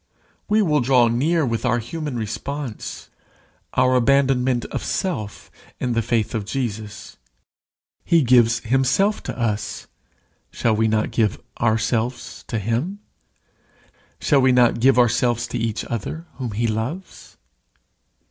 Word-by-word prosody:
We 215 +1 +4
will 150 -5 +2
draw 125 -1 +4
near 150 +7 +1
with 115 -2 -2
our 120 -1 +2
human 150 +4 -5
response, 120 +3 -5 0.6
our 125 0 +3
abandonment 130 -1 +2
of - - -3
self 110 - -3 0.3
in 125 -1 -1
the 115 - +1
faith 110 -1 -1
of 110 -3 -2
Jesus. 110 -3 -5 0.9
He 165 -3 +3
gives 120 -2 +4
himself 135 - +1
to - - -6
us 110 -3 -2 0.6
shall 115 -2 0
not 110 0 +2
we - - -5
give 110 -2 0 0.2
ourselves 115 +2 -1
to 115 - -2
him? 115 - -2 1.2
Shall 140 -3 +3
we 130 0 +4
not 125 -2 +4
give 130 +2 +4
ourselves 120 0 +2
to 125 - -3
each 115 -1 -2
other 120 - -5
whom 125 -5 -4
he 115 +3 -1
loves? 115 - -5
120 Hz, 130 wpm, -22 LUFS, 115-135 Hz, 1.2 s, We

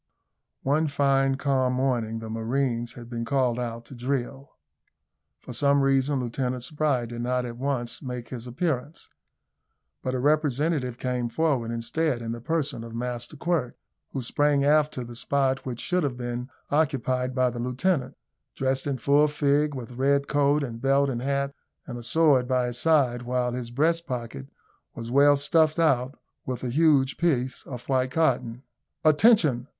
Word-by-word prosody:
One 150 +4 +2
fine 135 -1 +2
calm 135 -2 +1
morning 125 -4 0
the 110 0 -7
marines 120 +1 -1
had 120 -2 -10
been 120 -1 -4
called 125 -1 +1
out 115 -1 -4
to - - -12
drill. 135 +2 -3 0.9
For 125 - -10
some 140 +3 +3
reason 135 0 +2
Lieutenant 125 0 -2
Spry 145 -3 0
did 120 0 -6
not 125 +1 0
at 120 -1 -6
once 130 -3 -2
make 125 -4 -6
his 125 -1 -7
appearance, 145 +2 -3 0.9
but 130 0 -2
a - - -1
representative 145 -2 +1
came 125 -2 -2
forward 135 -4 0
instead 120 +3 -1
in 115 - -3
the 115 0 -6
person 145 -4 -2
of 115 0 -9
Master 120 +3 -4
Quirk, 155 -7 -1 0.3
who 135 - -4
sprang 145 +2 +2
aft 150 +1 +4
to 125 - -3
the 120 0 -9
spot 135 +1 0
which 120 -2 -4
should 180 0 0
have 135 -5 -2
been 120 +1 -4 0.2
occupied 130 -4 0
by 130 -1 +2
the 120 - -6
lieutenant, 130 +5 -1 0.4
dressed 135 +1 -1
in 140 -2 -1
full 145 +4 +4
fig, 145 0 +1
with 125 -2 -7
red 140 +3 +1
coat 145 0 +2
and 115 -3 -6
belt 135 +1 +3
and 120 -2 -3
hat, 140 +1 -1 0.3
and 130 -6 -7
a - - -8
sword 135 0 +3
by 125 -1 +1
his 120 0 -3
side, 140 -7 +3
while 125 0 -1
his 120 -1 -5
breast 165 +7 +1
pocket 115 - -5 0.5
was 115 0 -6
well 145 +2 +6
stuffed 155 +2 +2
out 135 -5 +2 0.3
with 130 -1 -5
a 125 - -2
huge 145 -2 +3
piece 130 -7 0
of 125 -2 -7
white 130 -1 +1
cotton. 125 -5 0 0.4
"Attention!" 155 - +4
130 Hz, 165 wpm, -26 LUFS, 120-145 Hz, 0.9 s, well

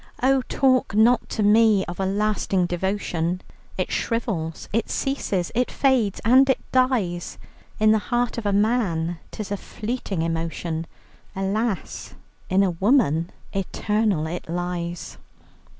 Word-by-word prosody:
"Oh, 265 0 +4
talk 255 -6 +2
not 235 +3 +4
to 215 - -1
me 210 -1 +5
of 175 - -7
a 190 - 0
lasting 200 -2 +1
devotion! 175 -1 -1 0.4
It - - -2
shrivels, 195 -9 -2
it 230 - 0
ceases, 205 -10 -1
it 250 +2 +1
fades 250 -8 +1
and 260 +4 +6
it 265 - +4
dies. 235 -10 +1 0.4
In 215 0 +5
the 220 - +4
heart 240 -1 0
of 215 - -3
a - - +2
man 195 -6 +1
'tis 210 -2 -7
a 205 - 0
fleeting 210 -5 -4
emotion; 165 0 -3 0.5
Alas, 195 0 -2 0.3
in 190 +2 +4
a 190 - +2
woman 175 - +2 0.2
eternal 200 -2 0
it 165 +1 -5
lies!" 175 - -4
200 Hz, 135 wpm, -23 LUFS, 175-230 Hz, 0.5 s, and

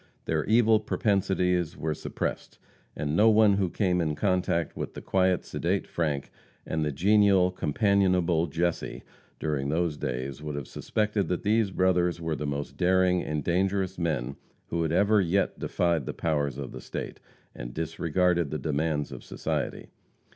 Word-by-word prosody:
Their - - 0
evil 110 0 +4
propensities 95 -5 0
were 80 0 -1
suppressed, - - -4 0.4
and 75 +1 -2
no 110 +6 +6
one 105 -2 +5
who 95 -3 +1
came 90 -1 +1
in 75 -2 -1
contact 90 -3 0
with - - -5
the - - -6
quiet, 95 -1 +1
sedate 95 +3 -1
Frank, 75 -5 -2 0.3
and 80 -1 -1
the 75 - 0
genial, 95 +3 +4
companionable 90 -1 +2
Jesse, 85 +2 -2 0.4
during 70 -3 -1
those 80 -1 0
days, 65 +3 -4
would 75 -1 -5
have 70 -3 -5
suspected 105 -2 -1
that 90 - -2
these 110 0 +2
brothers 90 -2 +1
were 80 -2 -2
the 75 - -4
most 70 0 -4
daring 90 0 +3
and 75 -2 -3
dangerous 95 +2 0
men 70 -6 -2 0.3
who 85 - -1
had 80 -1 0
ever 100 +4 +4
yet 95 +2 0
defied 85 -6 0
the - - -4
powers 75 -5 -1
of 70 -2 -6
the - - -8
State, - - -6 0.3
and - - -7
disregarded 85 +1 0
the 75 - -2
demands 75 +1 -1
of - - -8
society. - - -4
85 Hz, 160 wpm, -27 LUFS, 75-95 Hz, 0.4 s, no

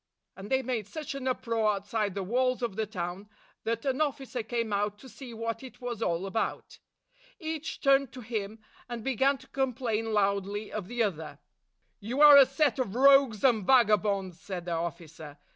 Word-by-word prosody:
" - - -56
And 195 +2 -9
they 265 0 +1
made 230 -5 -3
such 310 +5 -6
an 275 -1 -5
uproar 230 -4 0
outside 200 0 -2
the 200 - -2
walls 255 +5 0
of 230 -5 -2
the 220 0 -2
town 185 0 -5 0.4
that 230 +2 -2
an 270 +2 0
officer 275 -4 -2
came 230 -1 -3
out 205 +1 -1
to 260 - -14
see 260 0 -10
what 230 0 -4
it 260 -2 -11
was 240 -3 -5
all 175 -2 -1
about. 220 +3 -3 0.6
Each 320 -2 -5
turned 275 -2 +3
to 255 - -8
him, 220 -2 -4 0.3
and 235 -2 -5
began 270 +2 +2
to 260 0 -17
complain 235 -4 -1
loudly 200 0 0
of 210 -4 -5
the 240 +1 0
other. 160 -7 -4 0.6
"You 235 +6 -4
are 295 -1 +10
a 275 -2 +8
set 275 -1 +1
of 235 -5 -2
rogues 275 -4 +5
and 235 -6 +4
vagabonds!" 205 -6 +2
said 180 -3 -6
the 175 - -4
officer. 165 -3 -5
225 Hz, 185 wpm, -29 LUFS, 200-260 Hz, 0.6 s, are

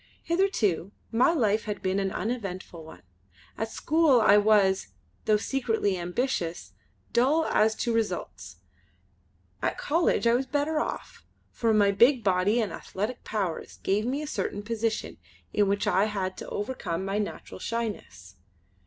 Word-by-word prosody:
Hitherto 235 - 0 0.2
my 240 +6 +4
life 220 -9 +1
had 210 -1 -5
been 190 +1 +1
an 195 -1 -1
uneventful 195 -7 -4
one. 160 +1 -13 0.5
At 225 - -3
school 310 -1 +3
I 215 -2 +6
was, 205 - +4 0.4
though 215 - +4
secretly 225 -4 0
ambitious, 175 -1 -2 0.4
dull 290 +7 +3
as 220 0 +2
to 235 - -1
results. 180 - -3 1.1
At - - -1
College 330 -4 +1
I 230 - +5
was 260 +2 +1
better 300 +2 0
off, - - -5 0.3
for 230 -2 0
my 205 -2 +4
big 240 +4 +4
body 195 +4 +2
and 210 -6 -1
athletic 215 +6 -5
powers 195 -6 -3
gave 210 +4 +1
me 280 +4 -1
a - - -4
certain 205 -7 -3
position 225 - -2 0.3
in 205 - +3
which 200 +1 0
I 195 +3 +3
had 195 -3 -3
to - - -7
overcome 205 -5 -3
my 195 +2 -1
natural 210 - -5
shyness. 210 - -5
215 Hz, 145 wpm, -27 LUFS, 195-240 Hz, 1.1 s, I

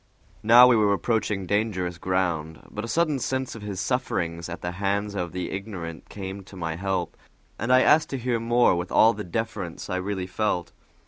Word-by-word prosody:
Now 120 +3 +8
we 125 -1 +6
were 105 -2 +3
approaching 105 -2 -1
dangerous 95 -4 -1
ground, 85 -4 -1
but 105 - -5
a - - -4
sudden 155 0 +1
sense 130 +1 -2
of 115 - -9
his 100 -3 -5
sufferings 85 -6 -2
at 85 - -6
the 90 - -2
hands 100 +1 0
of 90 -4 -3
the 90 0 -4
ignorant 95 -5 -6
came 95 0 -6
to 100 - -13
my 80 -3 -3
help, 95 -1 -2 0.4
and 115 +4 -1
I 130 0 +6
asked 155 +1 +4
to 135 - -3
hear 120 -1 -1
more 120 -3 +3
with 90 +1 -4
all 115 +1 +6
the 105 - -6
deference 100 -2 -4
I 95 - 0
really 95 0 -3
felt. 90 -1 -1
100 Hz, 195 wpm, -25 LUFS, 90-115 Hz, 0.4 s, Now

